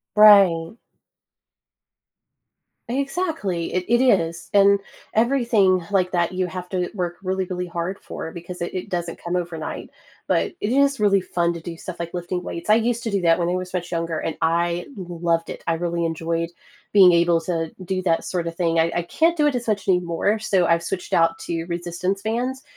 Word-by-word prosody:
Right. 195 -5 +6 2.1
Exactly, 275 - -2
it 180 - 0
it 240 +1 +3
is. 170 -9 +2
And 200 0 +5 0.4
everything 225 -6 +3
like 185 -3 +1
that 175 0 0
you 185 0 0
have 180 0 -6
to 180 -2 -1
work 175 -4 -3
really, 190 0 -1
really 180 0 -4
hard 175 +2 -4
for 160 - -7
because 175 +1 -9
i - - 0
it 180 +1 -5
doesn't 175 -2 -3
come 175 +1 -2
overnight. 170 -3 -4 0.4
But - - +1
it 205 - -1
is 275 0 +3
really 200 -2 +3
fun 170 -1 0
to 170 - -7
do 165 0 -7
stuff 175 +1 -8
like 170 0 -5
lifting 180 0 -3
weights, 170 +3 -6
I 215 - +7
used 235 +1 0
to 225 - -2
do 200 -1 0
that 165 0 +3
when 170 0 0
I - - 0
was 185 0 -5
much 180 -1 -3
younger, 165 -2 -2
and 165 - -4
I 170 +1 +1
loved 170 -3 -2
it, - - -7
I 165 - +1
really 170 0 -1
enjoyed 165 +1 -2 0.4
being 190 -3 +8
able 170 -1 +3
to 165 -1 -2
do 185 +1 -2
that 165 -3 +1
sort 175 -2 -2
of 165 - -4
thing, 165 -1 +1
I 165 +1 +2
I 175 - +1
can't 325 - +1
do 300 -3 +3
it 285 - +1
as 245 -1 -3
much 210 -2 -1
anymore, 180 +3 +1
so 190 -5 +2
I've 170 0 +2
switched 190 -2 -4
out 165 0 +3
to 165 -1 -4
resistance 175 +3 -3
bands 245 +5 -2
180 Hz, 195 wpm, -22 LUFS, 170-200 Hz, 2.1 s, being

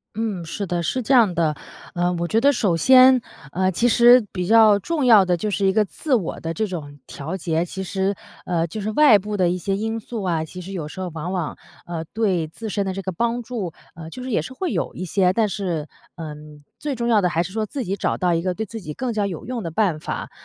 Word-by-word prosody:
嗯， 215 -5 -2
是 170 +5 -4
的， 175 -1 -2
是 250 +10 -2
这 265 - +1
样 225 -8 +5
的。 160 -3 +1 0.4
呃， 175 0 +1
我 170 0 -2
觉 225 +5 +1
得 280 +3 +5
首 210 -10 +1
先， 255 +7 +6 0.3
呃， 185 +3 +1
其 230 +7 +1
实 240 0 +6
比 180 -2 -3
较 220 -2 +6
重 305 - -1
要 220 -5 +7
的 180 -1 +1
就 210 +4 -2
是 195 0 +1
一 - - +4
个 215 0 +3
自 270 - -1
我 195 -9 -2
的 165 - -4
这 190 +7 -1
种 155 -7 -7
调 160 +7 -6
节， 165 -2 -1
其 190 +2 -6
实， 190 +1 -1 0.3
呃， 170 -2 0
就 190 +6 -6
是 205 - -2
外 235 -4 +6
部 205 +2 -4
的 180 -2 +3
一 180 - -1
些 195 +3 -1
因 225 +2 -2
素 225 -1 -6
啊， 170 -4 0
其 180 +3 -9
实 185 +2 -9
有 170 -6 -4
时 170 - -10
候 185 -1 -3
往 165 +2 -4
往， 180 -5 -3 0.3
呃， 170 -2 -4
对 190 -7 0
自 220 +8 -7
身 200 -1 -1
的 190 - -2
这 195 +1 -5
个 190 - -3
帮 235 +6 -1
助， 225 -7 -4 0.2
呃， 160 -1 -9
就 250 +9 -8
是 255 - -5
也 210 - +2
是 160 - -8
会 350 +6 -3
有 - - -2
一 185 - -5
些。 180 +1 +2
但 215 +2 +1
是， 175 -6 -3 0.3
嗯， 150 -2 -9 0.2
最 290 -2 -3
重 235 0 -2
要 225 -3 +4
的 180 - +2
还 170 0 0
是 180 - -7
说 215 -1 -2
自 270 +5 -4
己 195 -1 -2
找 200 - -1
到 180 -1 +1
一 165 - +1
个 180 0 -2
对 220 - -3
自 225 +1 -8
己 155 -5 -6
更 250 - -3
加 210 -2 0
有 175 -6 -6
用 245 0 -4
的 170 - -4
办 170 -3 0
法。 - - -5
190 Hz, 280 characters per minute, -22 LUFS, 170-225 Hz, 0.4 s, 要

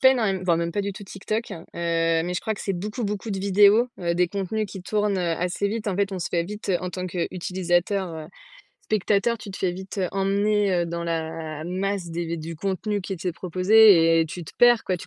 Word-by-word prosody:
pas 260 - +8
énorme 240 -5 +2
m 190 -1 -3
voire 170 -2 +3
même 170 0 -2
pas 205 - 0
du 200 - -3
tout 205 +2 -10
Tik 195 0 -11
Tok. 220 +2 -2
Heu, 165 - -8
mais 165 0 0
je - - -1
crois 220 - -2
que - - -10
c'est 195 - -2
beaucoup 210 +5 -4
beaucoup 210 +2 -3
de 195 - -2
vidéos. 205 +4 +5
Heu, 170 -1 0
des 180 0 +2
contenus 200 +3 -2
qui 190 -2 -9
tournent, 210 +1 0
heu, 175 -2 0
assez 180 +3 -1
vite. 220 +1 -4
En 195 -3 -1
fait 200 0 +1
on 190 - -3
se 170 - -3
fait 170 - 0
vite, 210 +3 -8
heu, 185 - +3
en 180 - -4
tant 185 +1 -4
qu'utilisateur, 180 +1 -1
heu 155 -1 -7 0.6
spectateur, 215 +2 +1
tu 210 -1 -9
te 190 - -7
fais 185 -2 0
vite, 190 +3 -8
heu, 185 -2 0
emmener, 200 +1 +1
heu, - - -5
dans 170 0 -4
la 160 -2 -4
masse 185 0 -2
des 170 0 -3
du 165 +1 -6
contenu 200 +3 -2
qui 195 - -5
était 180 0 -3
proposé 185 -2 +5
et 160 - +1
tu 170 +2 -7
te - - -11
perds 240 -1 +5
quoi, 185 - 0
tu - - -10
190 Hz, 245 wpm, -24 LUFS, 170-205 Hz, 0.6 s, pas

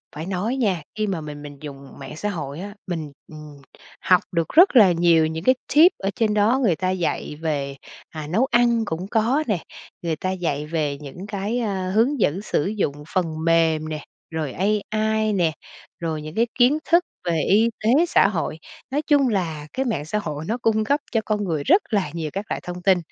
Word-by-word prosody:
Phải 155 +2 -5
nói 195 +7 -2
nha, 200 - 0
khi 215 0 -1
mà 185 -5 -2
mình 150 -1 -8
mình 145 -1 -9
dùng 140 -2 -10
mạng - - -8
xã 210 +6 -3
hội 150 -6 -5
á, 200 +2 -7
mình, 160 -5 -4 0.2
ừm, 150 -1 -11 0.4
học 180 -1 +4
được 165 -2 0
rất 345 -2 +6
là 210 -7 +8
nhiều 170 -1 +4
những 160 +1 -5
cái 255 +4 +5 0.2
tip 330 +5 +8
ở 195 - -2
trên 220 -2 +1
đó 215 +5 +3
người 190 -8 +3
ta 185 +3 -1
dạy 180 -4 -2
về, 140 -4 -2 0.3
à, 155 -2 -7
nấu 205 - +2
ăn 235 -2 +3
cũng 175 +1 -4
có 235 +8 +1
nè, 200 -7 -1 0.4
người 165 -2 -1
ta 185 +4 -3
dạy 160 -6 -2
về 150 -3 -2
những 150 +7 -9
cái, 210 +3 -2
ơ, 190 -5 -2
hướng 240 +8 +2
dẫn 185 -1 +1
sử 205 - -1
dụng 170 -8 -2
phần 185 -2 +2 0.2
mềm 160 -2 +2
nè, 155 -1 -5 0.3
rồi 155 -5 -3
AI 215 +2 0
nè, 175 -5 +2 0.5
rồi 160 -2 -3
những 155 +2 -8
cái 230 +2 +2
kiến 255 +4 +4
thức 340 +1 +5 0.2
về 170 -2 +1
y 220 +4 +5
tế, 270 +10 +4
xã - - +4
hội. 165 -5 -3 0.3
Nói 290 +2 +1
chung 290 -3 +3
là 160 -8 -2
cái 265 - -1
mạng 150 - -2
xã 210 +6 -1
hội 150 -5 -5
nó 225 +4 -1
cung 220 -2 +1
cấp 285 +7 +1
cho 225 - +1
con 210 -1 0
người 160 -6 -2
rất 375 +7 +5
là 200 -9 0
nhiều 165 -2 -3
các 195 +2 -3
loại - - -3
thông 180 0 -6
tin, 190 0 +4
185 Hz, 215 wpm, -23 LUFS, 160-220 Hz, 0.5 s, là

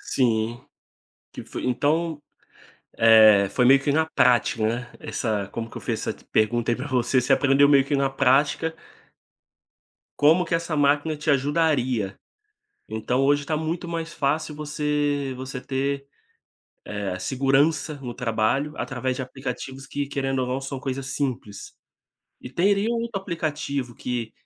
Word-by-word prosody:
Sim, 120 -2 0 0.7
que - - -8
fo - - -7
então, 150 +4 0 0.7
eh, 110 -3 +7
foi 125 - +1
meio 135 +2 +6
que 140 - +1
na 160 +1 +2
prática, 120 -6 +2
né, 120 +1 -3
essa 105 -4 -2
como 115 0 -5
que - - -13
eu - - -5
fiz - - -3
essa - - -2 0.2
pergunta 120 +2 +2
aí 120 - +1
pra - - -5
você, 130 0 +2
você 125 +2 +1
aprendeu 140 +1 +4
meio 140 -2 +5
que 145 +1 0
na 135 -1 +1
prática 140 +5 +2 1.4
como 160 +5 +5
que 165 - -8
essa 165 -1 0
máquina 145 +2 +2
te 150 +1 -1
ajudaria, 135 -7 +1 0.7
então 110 +4 -1
hoje 145 +1 +3
está 155 +2 -2
muito 165 +3 -3
mais 165 -1 -4
fácil 150 +2 -1
você 150 -2 -1
você 130 0 -6
ter, 140 +1 -2 0.9
eh, 100 -3 -3
segurança 140 - +1
no 125 -2 -5
trabalho 125 +5 -1
através 130 -1 -3
de 130 - -3
aplicativos 130 +1 -6
que 145 -1 -3
querendo 135 -1 -2
ou 130 - -1
não 130 +2 -2
são 135 0 -5
coisas 135 0 -4
simples. 130 -8 -4 0.7
E - - -9
teria 200 - +1
um 230 - -1
outro 230 -4 -3
aplicativo 150 - -3
que 120 -3 -4
135 Hz, 150 wpm, -24 LUFS, 125-150 Hz, 1.4 s, eh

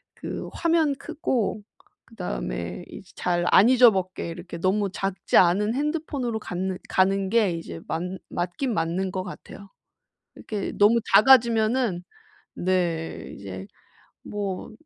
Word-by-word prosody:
그 - - -6
화면 330 -3 +2
크고 265 - -2 0.4
그다음에 180 - -5
이제 200 -3 -12
잘 175 -1 0
안 205 +5 +7
잊어먹게 210 -10 +4
이렇게 170 +1 -8
너무 195 +3 +1
작지 195 0 0
않은 195 +5 +4
핸드폰으로 285 -5 -2
갖는 185 -1 -3
가는 195 +1 +2
게 215 -3 +3
이제 165 - -6
맞 160 - -2 0.3
맞긴 180 +9 -2
맞는 175 +2 -1
것 185 -1 -3
같아요. 195 +2 -10 0.7
이렇게 210 -3 -4
너무 215 +3 +5
작아지면은 225 -3 +4 0.5
네. 175 -3 -2
이제 95 -1 -8 0.6
뭐 205 +1 -5
195 Hz, 245 characters per minute, -25 LUFS, 180-235 Hz, 0.7 s, 안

